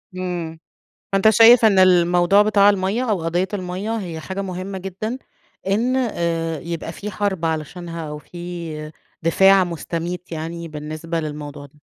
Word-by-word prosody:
امم، 175 -3 -4 0.5
فأنت 195 +2 +4
شايف 225 +2 +7
إن 200 -3 +5
الموضوع 180 +1 +5
بتاع 205 -1 +5
المَيَّة 200 +5 0
أو 190 -6 0
قضية 175 +3 0
المَيَّة، 195 +4 -3
هي 175 -6 -5
حاجة 190 +4 -5
مهمة 190 0 -5
جدًا 195 +6 -5 0.5
إن 230 +6 +1
آآ 170 - -1
يبقى 165 +1 -5
في 205 +4 -7
حرب 190 -4 -2
علشانها، 165 +2 -4
أو 150 - -5
في 170 -2 -7 0.3
دفاع 190 +4 +5
مستميت 175 +1 -5
يعني 165 +1 -5
بالنسبة 155 +2 -5
للموضوع 145 -2 -6
ده؟ 145 +2 -21
175 Hz, 140 wpm, -21 LUFS, 165-195 Hz, 0.5 s, شايف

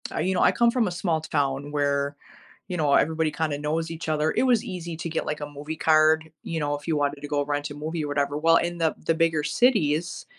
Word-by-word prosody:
uh, - - -1
you 190 - +1
know, 180 - +1
I - - +5
come 235 -1 +3
from 235 -4 +1
a - - -2
small 175 -2 -1
town 145 -2 -1
where, 140 -1 0 0.5
you 180 - -3
know, 145 -3 +2
everybody 160 +1 +2
kinda 155 -3 -2
knows 160 +2 -2
each 165 0 -5
other. 155 0 +1
It - - +2
was 245 -4 +3
easy 170 -2 -6
to 165 0 -4
get, 160 - -3
like, 150 0 -3
a 145 - -4
movie 145 +2 -6
card, 155 0 +3
you 165 -1 -3
know, 145 0 -1
if 145 +3 -10
you 160 - +1
wanted 145 0 -1
to 145 - -6
go 145 -1 0
rent 145 0 -2
a - - -7
movie 155 +2 -4
or - - -3
whatever. 145 0 -1
Well, 165 +2 +4
in 175 0 -2
the 160 -1 +1
the 165 - +3
bigger 165 -2 +1
cities, 170 - +1
155 Hz, 255 wpm, -25 LUFS, 145-165 Hz, 0.5 s, I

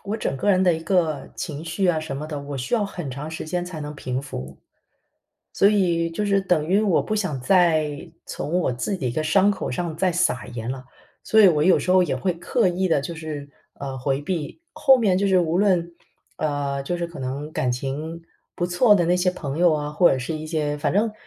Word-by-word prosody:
我 205 +2 -2
整 135 - -2
个 205 +10 +1
人 185 -1 +3
的 180 -2 +4
一 160 - -5
个 165 -4 0
情 155 -2 -5
绪 175 +4 -1
啊 175 -3 +2
什 155 -3 -5
么 150 +2 -5
的， 150 -2 -5
我 140 0 -6
需 130 - -1
要 220 -3 +1
很 175 -7 -6
长 145 +4 -6
时 160 - -6
间 175 +3 -2
才 175 -3 -7
能 150 0 -6
平复， 125 - -5 0.9
所 200 - +4
以 175 -5 +1
就 185 +6 -2
是 200 -1 +3
等 180 -5 +1
于 195 +3 +3
我 200 -6 +2
不 215 - -3
想 185 -11 -2
再 160 0 +2 0.2
从 165 +5 -2
我 145 - 0
自 125 +11 -2
己 135 -8 -2
一 - - -3
个 155 - -1
伤 195 +5 +4
口 205 - -3
上 160 +4 -3
再 185 +2 +1
撒 130 - 0
盐 115 0 -5
了。 130 0 -6 0.4
所 220 - +4
以 200 - +8
我 150 -4 +2
有 185 - +5
时 - - -2
候 185 0 +6
也 180 - -1
会 185 - 0
刻 205 +6 0
意 185 +1 0
地 160 - +3
就 170 +5 -5
是， 155 -3 -6 0.3
呃， 135 -1 -6
回 135 +2 -1
避， 160 - -4
后 265 -1 +5
面 195 -6 +2
就 200 0 +1
是 190 -1 +4
无 170 0 +1
论， 180 -4 +2 0.4
呃， 145 -2 -2
就 175 +6 -2
是 175 0 -2
可 170 - -11
能 140 +4 -5
感 125 - 0
情 150 +6 -5 0.3
不 175 - -2
错 205 +5 +4
的 175 -4 +2
那 175 - +3
些 180 0 +2
朋 150 -5 -5
友 175 0 +5
啊， 150 -1 -3
或 160 +4 +4
者 135 - +1
是 130 +6 -4
一 155 0 -6
些， 150 -2 -1
反 - - 0
正 215 +3 +1
165 Hz, 255 characters per minute, -23 LUFS, 145-185 Hz, 0.9 s, 以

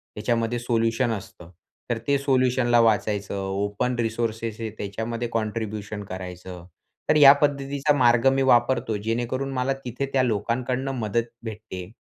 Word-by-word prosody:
त्याच्यामध्ये 115 +2 -1
सोल्युशन 115 0 0
असतं. 95 -5 -7 0.4
तर 120 - 0
ते 140 0 +3
सोल्युशनला 130 -3 +2
वाचायचं. 105 -3 +1
ओपन 100 +5 -2
रिसोर्सेस 115 -1 -2
आहे 115 -1 -3
त्याच्यामध्ये 115 +4 -4
कॉन्ट्रिब्युशन 110 -2 -3
करायचं. 90 -1 -8 0.4
तर 150 - +5
या 140 -2 +10
पद्धतीचा 140 0 +1
मार्ग 120 0 +4
मी 135 - +1
वापरतो, 120 -1 +1
जेणेकरून 120 +5 -2
मला 130 +1 0
तिथे 125 +3 -3
त्या 130 -1 +3
लोकांकडून 125 +4 -1
मदत 115 +2 -1
भेटते 105 -5 -7
115 Hz, 130 wpm, -24 LUFS, 105-125 Hz, 0.4 s, या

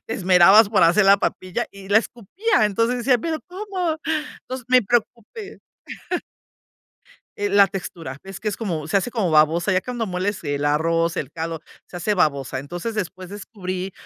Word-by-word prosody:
te - - -3
esmerabas 190 +3 +6
por 220 - +3
hacer 175 +5 +5
la 195 +1 +6
papilla 185 -2 -2
y 195 -1 -13
la 205 +2 +6
escupía. 240 - -1
Entonces 230 +4 +1
decía"Pero, 275 +5 +1
¿cómo?". 365 -4 -3 0.5
Entonces, 255 -1 -6
me 255 0 +6
preocupé. 240 - -3 1.8
Eh, 205 - -1
la 200 0 +5
textura. 170 -8 -7
Es 195 0 -9
que 215 - -2
es 205 - -3
como 170 -9 -3
se 160 - 0
hace 220 +6 -4
como 220 -8 -1
babosa, 160 +5 +3
ya 185 - +2
cuando 240 +1 -4
mueles 185 +2 -3
el 145 -1 -2
arroz, 165 +3 +1
el 135 - -3
caldo, 165 -1 -4 0.3
se 175 - -10
hace 205 +4 0
babosa. 140 -8 0
Entonces, 175 - -5
después 185 -2 -5
descubrí 190 -2 -6
195 Hz, 165 wpm, -22 LUFS, 170-230 Hz, 1.8 s, esmerabas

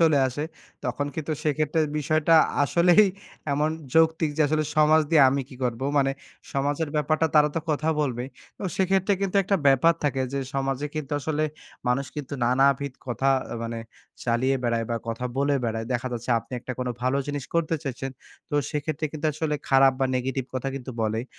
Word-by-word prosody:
চলে 160 -3 +5
আসে 145 +4 -4 0.4
তখন 130 +3 -1
কিন্তু 160 0 -3
সেক্ষেত্রে 155 +1 +1 0.2
বিষয়টা 155 +2 +2 0.3
আসলেই 175 +7 +5 0.5
এমন 150 +2 +1 0.2
যৌক্তিক 160 -1 +4
যে, - - -1
আসলে 155 +1 +1
সমাজ 155 +1 +6
দিয়ে 160 -4 +6
আমি 140 0 0
কি 135 - -12
করবো? 120 +1 -2
মানে 135 -1 +3 0.4
সমাজের 145 +3 0
ব্যাপারটা 155 +2 +2
তারা 150 0 +6
তো - - +1
কথা 155 +1 0
বলবেই। 125 -3 -2 0.3
তো - - -9
সেক্ষেত্রে 190 +1 +2
কিন্তু 195 0 0
একটা 195 +1 +1
ব্যাপার 135 +5 +5
থাকে 135 -2 +1
যে, 140 - -1 0.2
সমাজে 135 +1 -1
কিন্তু 150 -2 -4
আসলে 155 +1 -1 0.4
মানুষ 130 +2 +1
কিন্তু 145 -1 -5
নানাবিধ 135 +2 +2
কথা 130 +2 0 0.3
মানে 115 0 -4 0.5
চালিয়ে 130 +3 +2
বেড়ায় 115 -1 0
বা 115 - 0
কথা 115 +2 -3
বলে 140 +1 +2
বেড়ায়। 115 -1 -2
দেখা 125 +1 -1
যাচ্ছে 120 +1 -4
আপনি 115 - -14
একটা 125 - -5 0.3
ভালো 130 +2 +1
জিনিস 145 -2 -3
করতে 165 -1 +1
চাইছেন। 135 0 -4 0.4
তো - - -3 0.2
সেক্ষেত্রে 155 +1 -2
কিন্তু 155 0 -2
আসলে 155 0 -2
খারাপ 135 0 +6
বা 135 - +3
নেগেটিভ 130 +1 -2
কথা 130 +1 -2
কিন্তু 130 -1 -6
বলেই। 110 +2 -1
140 Hz, 175 wpm, -25 LUFS, 130-155 Hz, 0.5 s, সমাজ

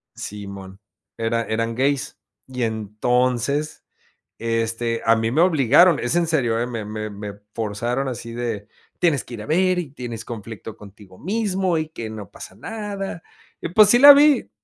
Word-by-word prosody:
simón, 100 -2 -8 0.4
era 115 0 0
eran 115 +1 -2
gays 135 +2 -1 0.3
y 125 -1 -4
entonces, 125 +6 -1 0.6
este, 115 0 -1
a 115 0 +5
mí 115 0 0
me 155 - +3
obligaron, 165 0 +5
es 120 +7 -1
en 175 -1 +2
serio, 120 -8 +1
¿eh?, 120 - -1
me 115 -3 -5
me 110 0 -5
me 105 0 -7 0.2
forzaron 120 +5 -2
así 115 -2 -6
de: 115 -4 -4 0.3
Tienes 165 -7 +2
que 120 - -9
ir 105 - -8
a - - -9
ver, 185 +3 +2
y 150 -6 -5
tienes 120 -5 -7
conflicto 110 -1 -8
contigo 100 -2 -15
mismo 190 -3 0
y 155 -1 -2
que 115 -8 -7
no 105 -4 -8
pasa - - -11
nada", 205 -5 -6 0.4
y - - -3
pues, 210 +3 +6
sí 240 - +6
la 285 +2 +11
vi. 290 0 +4
120 Hz, 170 wpm, -22 LUFS, 110-160 Hz, 0.6 s, la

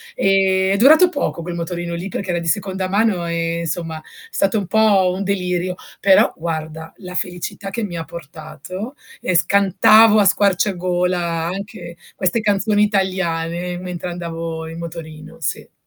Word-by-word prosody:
Ehm, 190 -1 +3
è 200 - +1
durato 310 - +7
poco 285 - -2
quel 175 +1 -5
motorino 170 0 -4
lì, 170 +3 -4
perché 190 0 -5
era 175 - 0
di 170 - -5
seconda 190 0 -1
mano 200 -2 +1
e, 170 0 -1
insomma, 165 -1 -4 0.3
stato 220 - +1
un 200 - -4
po' 205 -4 +4
un 195 - -3
delirio, 180 -2 -1 0.3
però 195 -1 +5
guarda 160 -1 -5
la 180 -2 -9
felicità 180 +2 -4
che 230 +3 -3
mi 180 -5 -4
ha 165 - -3
portato, 170 - -8 0.3
e 185 - -1
scantavo 200 +4 +5
a 205 - +4
squarciagola 180 -2 +1 0.3
anche 185 -1 -6 0.2
queste 185 +4 0
canzoni 205 0 +2
italiane 180 -3 -1
mentre 180 -1 -5
andavo 165 -1 -5
in 165 +1 -8
motorino, 165 -1 -8
sì. - - -4
180 Hz, 150 wpm, -19 LUFS, 170-200 Hz, 0.3 s, durato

